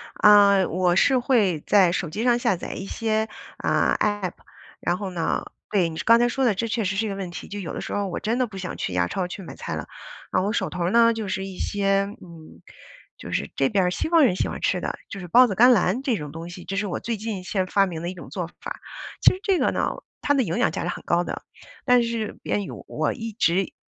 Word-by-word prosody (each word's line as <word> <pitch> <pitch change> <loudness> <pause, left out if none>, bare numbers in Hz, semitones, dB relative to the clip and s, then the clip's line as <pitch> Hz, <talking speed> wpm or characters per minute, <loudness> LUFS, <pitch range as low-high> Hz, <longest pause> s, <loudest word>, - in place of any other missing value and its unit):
啊， 200 -2 +6
我 180 +1 +1
是 260 +7 +4
会 210 - +2
在 190 -4 +5
手 175 -1 -2
机 210 +8 -3
上 240 -1 +4
下 235 -6 +2
载 - - -6
一 195 - -6
些， 220 +1 -1 0.3
呃 - - +2
，App， 205 -4 0 0.5
然 175 - 0
后 195 0 -4
呢， 170 -3 -1 0.3
对， 185 -5 +3
你 160 - -8
这 - - -3
刚 230 +1 +6
才 240 - +4
说 265 +2 -1
的 230 - +4
这 230 - -1
确 230 0 -1
实 195 0 -1
是 220 +3 0
一 - - -2
个 195 - -3
问 190 -3 -5
题， - - -8
就 205 - -6
有 180 -5 -5
的 - - -4
时 - - -5
候 205 -1 -1
我 180 - -4
真 225 +3 -1
的 255 - +1
不 205 -3 -10
想 185 -1 -5
去 90 - -3
亚 90 -1 +1
超 180 - -2
去 185 +2 -8
买 - - -9
菜 - - -5
了， - - -5 0.4
啊， - - +2
我 200 +2 0
手 - - 0
头 175 -1 -1
呢， 230 +2 +5
就 220 -2 -4
是 190 0 -2
一 190 -1 -8
些， 195 -1 +1 0.2
嗯， 165 -3 -13 0.6
就 - - -9
是 - - -1
这 135 -1 +2
边 195 -2 +2
儿 180 - +1
西 250 - -2
方 330 -2 +5
人 220 -9 +3
喜 - - 0
欢 - - -5
吃 - - +1
的， - - -3
就 200 - -7
是 180 - -7
抱 245 +8 +7
子 195 - -3
甘 245 +3 +7
蓝 210 +1 +2
这 255 -6 +1
种 150 -3 -7
东 165 +2 -8
西， 175 0 -9
这 195 - -4
是 200 +1 -1
我 180 - -3
最 230 0 -3
近 210 -3 -4
现 185 0 -1
发 200 +1 +3
明 170 -4 -5
的 170 - -3
一 - - -5
种 175 - -11
做 180 -3 -4
法。 - - -6 0.4
其 - - +7
实 370 - -7
这 385 -4 +2
个 - - +2
呢， - - 0 0.3
它 285 - +2
的 270 -3 +3
营 170 -4 -2
养 - - +2
价 - - -4
值 175 - -2
很 - - -5
高 170 +1 +2
的。 - - -5 0.4
但 250 -1 +5
是 230 -2 -3
变 205 - -1
异 - - -7 0.2
我 155 0 -1
一 225 -1 -6
直 190 -3 +1
195 Hz, 295 characters per minute, -24 LUFS, 180-225 Hz, 0.6 s, 抱